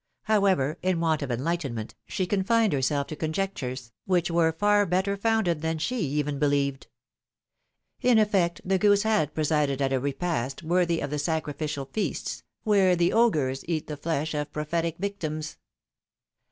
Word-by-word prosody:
However, 190 -8 +2
in 185 -2 +1
want 160 -2 +1
of 140 - -3
enlightenment, 130 -3 -2
she 185 - -1
confined 205 +2 +2
herself 140 +1 +1
to 155 - -7
conjectures, 150 -8 -3
which 175 -2 +1
were 165 -1 +3
far 205 +4 +3
better 190 +3 +1
founded 200 -6 +1
than 160 0 -1
she 240 +11 -2
even 145 -3 -1
believed. 140 -2 0 1.1
In 245 -2 +4
effect, 195 -6 +2
the 190 0 +1
goose 205 +1 +4
had 210 -10 +1
presided 150 -3 +1
at 135 -1 +1
a 130 - +2
repast 140 0 -2
worthy 170 0 +1
of 145 - -3
the 150 - -1
sacrificial 150 -2 -2
feasts, 215 +10 -3 0.2
where 195 -4 +4
the 175 0 +2
augurs 150 - +2
eat 160 -3 -1
the 150 - -5
flesh 155 0 -2
of 150 0 -3
pro 150 0 -3
phetic 165 +1 -1
victims. 155 -6 -4
160 Hz, 155 wpm, -26 LUFS, 145-190 Hz, 1.1 s, In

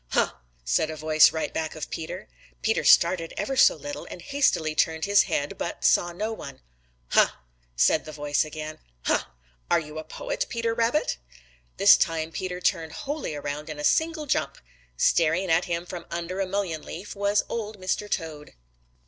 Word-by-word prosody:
"Huh!" - - +2 0.3
said - - +1
a 155 - -4
voice 155 0 +5
right 160 - -3
back 160 -1 -3
of 155 - -6
Peter. 160 - -6 0.4
Peter - - +1
started 165 -3 +4
ever 270 - -2
so 260 - +6
little 290 0 -7
and - - -8
hastily 275 - +1
turned 160 +1 +1
his 200 0 +5
head, 145 +1 -2
but 170 - -4
saw 175 - +4
no 215 +6 -3
one. 145 -10 -9 0.5
"Huh!" - - +6 0.5
said 150 - +3
the 155 - -7
voice 145 -1 0
again. 155 0 -7 0.2
"Huh! - - +1 0.4
Are 170 - +4
you 155 -1 -7
a - - -6
poet, - - -4
Peter 230 -1 -1
Rabbit?" 235 - +1 0.6
This - - +8
time 160 0 0
Peter 180 +1 -4
turned 165 -3 0
wholly 280 - -4
around 145 +1 -5
in 155 - -6
a 150 - -6
single 320 - +2
jump. 275 - -1 0.4
Staring 165 - +2
up 160 - +6
at 175 - -3
him 170 0 -2
from 175 -1 -8
under 170 +2 -4
a 195 - 0
mullein 185 -5 -2
leaf 190 +8 -8
was 200 +1 +2
Old 215 -2 -4
Mr. 190 +3 -2
Toad. 155 - -4
170 Hz, 180 wpm, -26 LUFS, 155-205 Hz, 0.6 s, This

